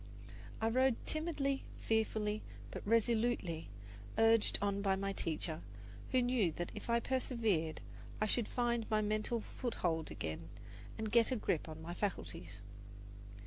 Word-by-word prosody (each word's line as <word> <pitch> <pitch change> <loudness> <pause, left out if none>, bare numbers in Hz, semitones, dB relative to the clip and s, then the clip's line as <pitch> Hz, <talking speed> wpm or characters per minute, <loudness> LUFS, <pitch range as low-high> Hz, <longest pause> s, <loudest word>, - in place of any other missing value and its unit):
I 225 - +2
wrote 255 +1 +4
timidly, 300 -4 0 0.2
fearfully, 215 -1 +1 0.3
but - - -5
resolutely, 225 - +2 0.5
urged 225 -1 +5
on 200 0 0
by 195 -1 +3
my 195 0 -1
teacher, 160 -2 -2 0.5
who 255 -1 +4
knew 245 -8 +3
that 175 +2 -3
if - - -7
I 235 0 +4
persevered, 225 - 0 0.4
I 215 - +3
should 220 +1 +1
find 240 -2 0
my 215 -1 +3
mental 215 +2 0
foothold 175 - -2
again 80 -1 -4 0.5
and 220 -1 -2
get 235 +1 +5
a - - +2
grip 170 -8 0
on 160 0 -8
my 170 +2 -4
faculties. 170 - -4
215 Hz, 140 wpm, -36 LUFS, 180-235 Hz, 0.5 s, urged